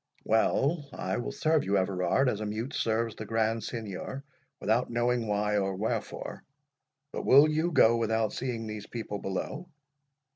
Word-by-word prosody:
"Well, 140 +7 +2
I 95 - -2
will 120 - -3
serve 155 -1 +2
you, 100 +1 +1
Everard, 95 +7 +1
as 110 -4 0
a - - -2
mute 110 +6 -4
serves 115 0 0
the 110 - -6
Grand 115 +1 0
Signior, 115 +4 -5 0.4
without 115 +4 +1
knowing 120 0 0
why 105 0 +1
or 95 -1 -1
wherefore. 105 +4 -3 0.7
But - - -3
will 140 +3 +7
you 155 +3 0
go 115 -7 +5
without 110 -1 0
seeing 120 -3 -3
these 110 -1 -6
people 110 -3 -5
below?" 135 - -4
115 Hz, 155 wpm, -29 LUFS, 105-125 Hz, 0.7 s, will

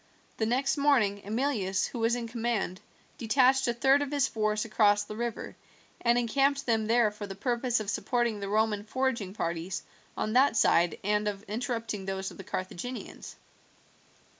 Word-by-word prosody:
The 220 - 0
next 265 +5 +1
morning 240 -9 +2
Emilius, 210 -4 0
who 240 - -6
was 230 +1 +2
in 240 -1 -4
command, 225 -5 -2 0.4
detached 265 +3 +3
a 240 - +1
third 270 +4 +4
of 290 - -2
his 285 -2 +1
force 215 0 -1
across 205 -2 +3
the 210 +1 -8
river, 235 0 -4 0.5
and 240 0 +4
encamped 275 +4 +1
them 225 -3 +1
there 230 -1 +3
for 210 0 -7
the 195 - -7
purpose 240 +2 0
of 215 - -5
supporting 235 0 0
the 200 -1 -4
Roman 215 -1 +1
foraging 230 -4 -2
parties 170 0 -3 0.3
on 215 - -1
that 255 -2 +4
side 170 -5 +3
and 210 +1 +1
of 205 -1 -3
interrupting 225 -2 -3
those 190 0 -3
of - - -13
the 195 - -8
Carthaginians. 185 +7 -6
225 Hz, 165 wpm, -29 LUFS, 205-245 Hz, 0.5 s, third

